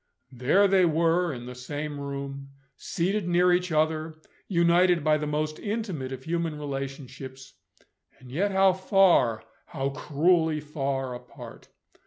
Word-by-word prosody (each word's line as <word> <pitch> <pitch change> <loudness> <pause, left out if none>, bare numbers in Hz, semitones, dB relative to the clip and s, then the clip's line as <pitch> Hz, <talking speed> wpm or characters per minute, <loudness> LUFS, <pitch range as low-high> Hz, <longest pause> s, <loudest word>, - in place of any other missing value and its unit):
There 135 +11 +3
they 190 -1 +4
were, 170 +1 +2
in 120 -3 -7
the 125 - -7
same 145 +4 -5
room 140 0 -6 0.3
seated 190 +3 -2
near 180 +1 +4
each 180 0 0
other; 155 0 0 0.3
united 170 -1 +3
by 155 0 +3
the 150 - -3
most 155 +1 -2
intimate 200 - -4
of 130 0 -7
human 165 -1 -2
relationships 135 -2 -7 0.6
and 125 -1 -14
yet 190 +9 0
how 190 -1 +4
far, 185 - +3 0.2
how 135 +1 -2
cruelly 155 +3 +1
far, 135 -3 -3
apart! 125 - -11
155 Hz, 135 wpm, -27 LUFS, 135-175 Hz, 0.6 s, they